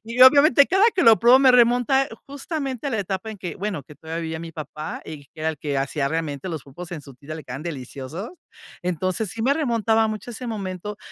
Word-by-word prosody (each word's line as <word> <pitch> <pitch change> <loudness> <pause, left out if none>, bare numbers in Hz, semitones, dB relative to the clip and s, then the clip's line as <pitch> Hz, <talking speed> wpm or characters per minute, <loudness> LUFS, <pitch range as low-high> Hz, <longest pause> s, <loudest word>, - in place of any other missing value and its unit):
Y, 230 +2 -7
obviamente, 280 +1 +7
cada 385 +4 +3
que 370 - +2
lo 225 -6 +7
pruebo 240 +3 +7
me 265 -1 +6
remonta 245 +2 +4 0.2
justamente 280 -2 -4
a - - -1
la 225 - -1
etapa 195 +2 -4
en 215 - -8
que, 180 -2 -6
bueno, 195 -6 -3
que 150 +3 -15
todavía 160 +2 -6
vivía 160 0 -4
mi 165 0 -7
papá, 155 0 -7
y 145 -3 -9
que 155 - -15
era 160 +1 +1
el 155 - -9
que 145 -2 -3
hacía 140 +1 -1
realmente 160 0 -3
los 160 -5 -4
pulpos 170 +6 -10
en 155 -4 -6
su 140 -1 -12
tinta, 145 +5 -9
le 155 - -9
quedaban 130 +4 -7
deliciosos. 145 - -6 0.5
Entonces, 185 +4 -1
sí 225 - -5
me 260 +4 +3
remontaba 225 -6 +1
mucho 215 +3 -5
a - - -7
ese 250 +2 -7
momento 205 -2 -5
190 Hz, 230 wpm, -23 LUFS, 155-240 Hz, 0.5 s, obviamente